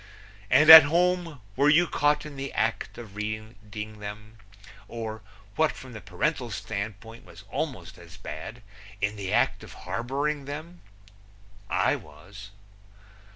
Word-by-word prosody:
And 150 +5 +7
at 160 0 +15
home 170 -1 0
were 140 +3 +3
you 165 +4 +5
caught 150 -2 +1
in 150 -2 -9
the 135 0 -5
act 110 +2 -2
of 110 -4 -11
reading 110 0 -7
them, 105 +1 -9 0.5
or 110 -2 -6 0.3
what 160 -1 +2
from 130 -1 -12
the 110 - -9
parental 150 -5 -2
standpoint 110 +2 -6
was - - -15
almost - - -5
as - - -14
bad 105 +10 -8 0.4
in 105 +1 -1
the 100 -2 -5
act - - +1
of - - -11
harboring 135 +9 -2
them? 155 +5 -8 0.9
I - - +1
was. 95 +7 -13
115 Hz, 135 wpm, -26 LUFS, 105-145 Hz, 0.9 s, at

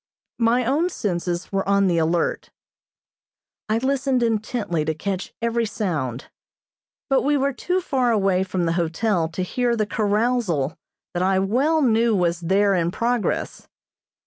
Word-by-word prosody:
My 235 +2 +2
own 300 +8 +1
senses 175 - -3
were 195 0 -1
on 200 0 +4
the 175 -3 +2
alert. 165 +1 0 1.2
I 215 - +2
listened 265 0 +1
intently 215 -7 -1
to 155 +1 -2
catch 190 +3 -4
every 235 0 +1
sound, 150 - -3 0.8
but 270 -2 +3
we 290 +1 +2
were 275 0 0
too 360 +7 -1
far 265 -8 0
away 195 -4 +2
from 185 -2 -1
the 165 - +1
hotel 170 +1 0
to 175 +3 -3
hear 240 +5 0
the 215 -2 0
carousal 205 - 0 0.4
that 175 - -1
I 190 +1 +2
well 265 +12 +2
knew 230 -2 +3
was 175 -2 +1
there 195 +4 +2
in 170 -2 +1
progress. 235 +4 -2
205 Hz, 145 wpm, -23 LUFS, 175-245 Hz, 1.2 s, on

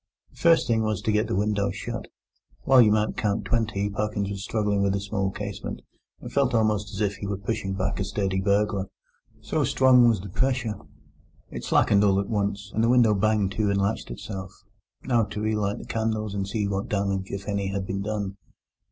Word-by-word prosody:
The - - -23
first 165 -1 +4
thing 115 -2 +1
was 110 -3 0
to 110 - +1
get 105 +2 +1
the - - -1
window 100 0 +1
shut. 95 - -5 0.6
While 130 -1 +6
you 110 -3 +5
might 105 0 +1
count 105 0 0
twenty 110 -4 0
Parkins 100 -1 -2
was 100 -1 -5
struggling 105 -3 0
with 100 -1 +2
the 100 - 0
small 100 0 -1
casement, 100 0 -6 0.4
and - - -9
felt 135 -4 +2
almost 105 -2 +1
as 100 -1 -5
if 100 -1 0
he 100 - -5
were 100 -1 -2
pushing 100 -1 -3
back 95 0 -2
a - - +1
sturdy 95 -1 -1
burglar, 100 -1 +1 0.5
so - - -1
strong 125 -2 +5
was 110 -4 +1
the 100 +2 -8
pressure. 125 +1 0 0.8
It - - -6
slackened 100 0 +4
all 100 -1 +4
at 100 - -3
once, 100 -1 -2
and 110 - +1
the 115 - +3
window 120 -3 +5
banged 105 -1 +1
to 105 +1 0
and 100 0 +1
latched 100 +3 -1
itself. 95 - -6 0.5
Now 120 -3 +2
to 105 +1 -6
relight 105 -1 0
the - - -9
candles 110 -2 -2
and 100 -1 -2
see 105 0 -1
what 100 0 -3
damage, 100 -2 -1
if 100 0 -6
any, 100 -1 -1
had 95 0 -3
been 95 +1 -3
done. 100 -1 -3
100 Hz, 205 wpm, -25 LUFS, 100-110 Hz, 0.8 s, While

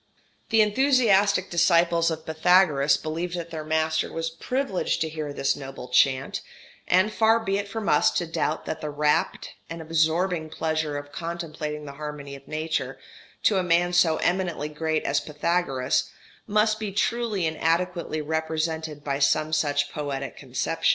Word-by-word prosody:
] - - -39
The 225 -1 +5
enthusiastic 210 -5 +3
disciples 170 -1 +3
of 160 -1 -5
Pythagoras 160 -4 +4
believed 165 +3 -4
that 170 -1 -6
their 160 -2 -5
master 160 0 0
was 165 0 -3
privileged 205 +4 -1
to 160 - 0
hear 155 -2 -5
this 140 -1 0
noble 135 -2 -8
chant; 130 +1 +2 0.5
and 190 +4 +3
far 225 +1 +4
be 200 -3 -1
it 200 - -4
from 220 +1 -5
us - - +4
to 175 - 0
doubt 165 - -2
that 160 - -4
the 150 - -3
rapt 150 0 0 0.2
and 165 0 -6
absorbing 160 +1 0
pleasure 155 -2 -2
of 145 0 -8
contemplating 155 -3 -5
the 140 - -7
harmony 145 -2 -6
of 135 0 -14
nature, 155 +1 -2 0.5
to 200 -3 +4
a - - 0
man 175 0 +2
so 170 -3 +4
eminently 175 -4 -1
great 155 +1 -1
as 140 - +1
Pythagoras, 150 -3 0 0.4
must 215 +1 +2
be 215 -2 -3
truly 215 -2 0
and 160 -1 -2
adequately 170 -1 0
represented 160 -1 -2
by 140 -1 -2
some 155 +2 +2
such 145 -2 +1
poetic 140 -3 -4
conception. - - -1
160 Hz, 160 wpm, -25 LUFS, 150-180 Hz, 0.5 s, The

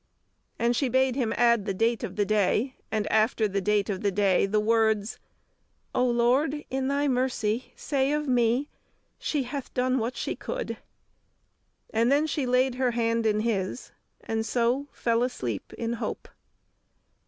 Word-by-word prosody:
'" - - -47
And 235 +1 +1
she 270 +1 +1
bade 260 0 +2
him 245 -5 0
add 235 -3 +3
the 195 -3 -2
date 230 +3 +1
of - - -5
the 205 - +1
day, 215 +5 +1 0.2
and 215 -2 0
after 220 0 +3
the 200 0 -2
date 205 0 +1
of 195 -3 -3
the 205 - +2
day, 195 -1 +2
the 210 +2 +1
words, 220 -1 +1 0.7
"O 250 - +2
Lord, 260 +5 +1
in 265 0 -1
Thy 285 +1 +1
mercy 250 -3 0
say 275 -1 0
of 300 0 -1
me 245 +2 +2 0.5
She 290 -3 -1
hath 260 +2 -6
done 255 +1 +1
what 235 +2 -2
she - - -2
could!" - - -4 1.1
And 230 +3 +2
then 290 +2 +3
she 295 -4 -2
laid 250 +1 +2
her 255 - +3
hand 230 -1 +1
in 215 0 +2
his, 215 0 -2 0.3
and 220 0 -2
so 245 +5 0
fell 230 0 0
asleep 125 - -3
in 230 0 -3
hope. 230 -2 -4
235 Hz, 165 wpm, -27 LUFS, 215-260 Hz, 1.1 s, add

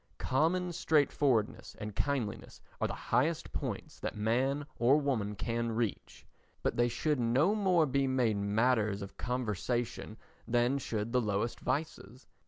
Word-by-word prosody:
Common 170 +7 +1
straightforwardness 145 -8 +1
and 105 -1 -6
kindliness 135 -6 -2 0.2
are - - +2
the - - -8
highest 150 +7 +1
points - - -4
that - - -4
man 130 +7 +1
or 125 +5 +5
woman 115 -8 -1
can 115 +2 -2
reach, 115 -2 -3 0.4
but - - 0
they 120 0 +3
should 150 +4 0
no 130 - +3
more 185 -6 +3
be 140 -1 +1
made 125 -5 +2
matters 105 0 +1
of 100 - -9
conversation 120 -1 -2 0.3
than 120 +3 +2
should 110 -3 -3
the 125 - +4
lowest 105 +1 -1
vices. 135 -5 -3
120 Hz, 140 wpm, -32 LUFS, 110-140 Hz, 0.4 s, or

